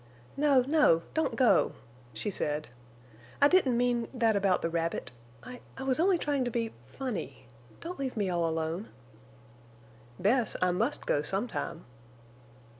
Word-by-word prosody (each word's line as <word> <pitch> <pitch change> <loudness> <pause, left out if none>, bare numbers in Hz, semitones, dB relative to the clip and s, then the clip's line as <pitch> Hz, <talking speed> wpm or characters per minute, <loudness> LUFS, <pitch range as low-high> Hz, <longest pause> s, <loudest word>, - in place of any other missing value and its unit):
"No, 280 -2 +4
no, 275 - +4
don't 320 - 0
go!" 255 -4 +4 0.4
she 115 - -4
said. 150 -4 -2 0.7
"I 285 - +7
didn't 290 -8 +3
mean—that 240 -2 +1
about 195 -2 +2
the 165 - 0
rabbit. 165 -4 -2 0.3
I—I 250 +1 -10
was 265 +1 +1
only 365 +2 +4
trying 290 -4 0
to 245 - -1
be—funny. 225 - -5 0.4
Don't 350 0 -6
leave 265 -4 -3
me 205 -2 0
all 170 -2 0
alone!" 160 +5 -3 1.3
"Bess, 225 +4 +2
I 180 0 +2
must 225 +11 -1
go 145 - +1
sometime." 195 -1 -2
235 Hz, 130 wpm, -30 LUFS, 170-270 Hz, 1.3 s, I